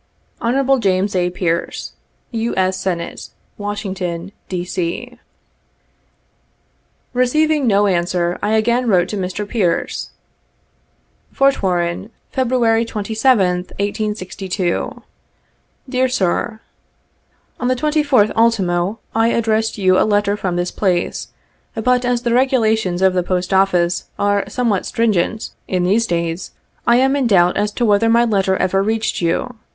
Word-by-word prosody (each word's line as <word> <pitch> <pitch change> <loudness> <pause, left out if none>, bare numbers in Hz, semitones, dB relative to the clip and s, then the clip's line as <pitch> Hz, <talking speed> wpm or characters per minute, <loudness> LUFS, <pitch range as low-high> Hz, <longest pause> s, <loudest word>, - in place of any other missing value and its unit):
"Hon. 270 +3 +2
James 195 0 +1
A. 180 -1 +1
Pearce, 175 -1 -2 0.4
U. 230 0 -2
S. 185 0 +2
Senate, 180 -2 -4 0.3
Washington, 195 -3 -4 0.2
D. 180 -1 -3
C." 190 +8 -4 1.9
Keceiving 295 +4 +2
no 205 -1 +4
answer, 175 -2 0
I 215 - 0
again 235 +3 +2
wrote 180 -3 +3
to - - -3
Mr. 190 +2 -3
Pearce: 195 -7 -1 0.6
" - - -42
Fort 275 0 +2
Warren, 175 +1 -1 0.2
February 240 -3 +2
27th, 210 -4 +1
1862. 200 -3 -3 0.8
"Dear 255 0 +1
Sir: 220 0 -1 0.3
— - - -44
" - - -41
On 245 - -1
the 255 - +2
24th 290 -5 +2
ult. 200 -4 +1 0.2
I 225 +1 +3
addressed 225 -1 0
you 185 -2 +3
a - - +4
letter 205 -1 +2
from 185 -4 -2
this 175 0 -1
place, 180 -4 -1 0.5
but, 250 +3 +1
as 245 -1 0
the 235 -2 +1
regulations 220 -8 +2
of 190 -1 +4
the 180 - +1
post 180 +1 -2
office 180 -2 +2
are 205 0 0
somewhat 230 -7 0
stringent 220 -1 0 0.2
in 180 -1 0
72 180 - +1
these 230 +1 +2
days, 170 0 -2 0.4
I 235 - +6
am 265 +2 +3
in 275 -4 +1
doubt 180 -4 +4
as 210 +1 0
to 240 - 0
whether 215 +1 +3
my 235 +1 +4
letter 195 -4 +1
ever 195 +1 +1
reached 220 0 -1
you. 200 +9 -1
205 Hz, 135 wpm, -18 LUFS, 185-235 Hz, 1.9 s, I